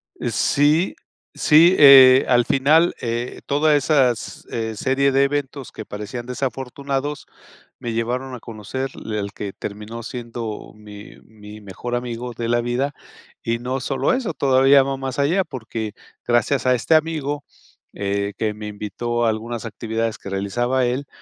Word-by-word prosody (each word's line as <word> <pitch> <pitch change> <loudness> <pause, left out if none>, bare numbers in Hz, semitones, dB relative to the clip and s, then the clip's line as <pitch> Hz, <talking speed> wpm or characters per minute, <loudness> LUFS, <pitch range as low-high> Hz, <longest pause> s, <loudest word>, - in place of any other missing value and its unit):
Eh - - -3
sí, 150 +5 +2 0.4
sí, 165 +4 +5
eh, 135 -2 +9
al 120 -1 +4
final, 155 +7 +3
eh, 120 +1 -3
todas 150 +2 +3
esas, 135 -5 +1
eh, 110 -1 -3
serie 135 +4 +1
de 135 +1 +3
eventos 140 -1 -3
que 110 - -8
parecían 105 +4 -6
desafortunados, 135 +3 -4 0.5
me 120 -1 -4
llevaron 125 +3 -2
a 125 - -9
conocer 115 +4 -5
l 110 -1 -5
el 100 -1 -3
que 100 -2 -6
terminó 105 +3 -7
siendo 115 -2 -6
mi 105 -1 -12
mi 105 -1 -13
mejor 105 +5 -5
amigo 120 0 -4
de 115 0 -4
la 120 0 +2
vida. 125 +4 -1 0.5
Y 115 0 -1
no 130 +2 -3
solo 135 +1 0
eso, 250 -10 -2
todavía 135 0 +5
va 135 0 -3
más 135 0 -5
allá, 170 +7 +2
porque 115 -6 -6 0.3
gracias 120 +3 +1
a 125 - +4
este 160 +6 +2
amigo, 150 -2 -1 0.5
eh, 100 0 -2
que 110 -1 -1
me 105 0 -8
invitó 110 +3 -3
a - - +3
algunas 115 +1 -4
actividades 115 0 -3
que - - -9
realizaba 120 +7 0
él, 130 +3 -2
125 Hz, 155 wpm, -21 LUFS, 110-140 Hz, 0.5 s, eh